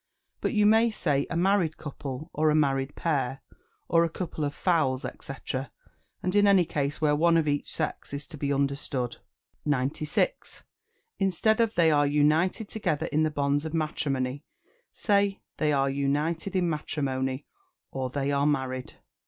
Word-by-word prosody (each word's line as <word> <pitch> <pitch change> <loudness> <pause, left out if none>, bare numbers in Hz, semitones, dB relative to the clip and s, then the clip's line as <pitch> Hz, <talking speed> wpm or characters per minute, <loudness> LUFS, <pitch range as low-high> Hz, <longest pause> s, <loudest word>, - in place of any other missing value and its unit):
But - - 0
you 210 -2 +3
may 225 +2 +5
say 145 -10 0
"A 175 - -2
married 180 -3 +2
couple," 145 +1 -7
or, 155 +1 +2
"A 150 - +3
married 135 -2 +1
pair," 135 -4 -1 0.5
or, 165 0 +4
"A 170 - +1
couple 165 -2 -4
of 145 - 0
fowls," 150 -6 +1 0.2
&c., 135 - -6 0.9
in 205 +3 +3
any 195 -3 +5
case 145 -2 -2
where 150 -1 +3
one 165 +2 +4
of 160 -2 +1
each 145 0 -1
sex 155 - -3
is 140 +1 -4
to 165 - -9
be 140 -1 -2
understood. 140 -3 -1 0.5
96. 150 - -1 0.6
Instead 195 +3 +2
of 225 -1 +1
"They 165 -2 +5
are 145 -1 +4
united 155 +8 +2
together 180 -9 -1
in 155 +2 +2
the 155 - +3
bonds 145 -1 0
of 160 0 -4
matrimony," 140 -3 -1 0.5
say 200 -1 +1 0.2
"They 155 -1 +1
are 140 -1 +2
united 145 +7 -1
in 180 -2 +2
matrimony," 135 -4 -2 0.5
or, 130 -1 -3
"They 140 +2 -1
are 140 +1 +2
married." 130 -3 -1
150 Hz, 160 wpm, -27 LUFS, 140-170 Hz, 0.9 s, may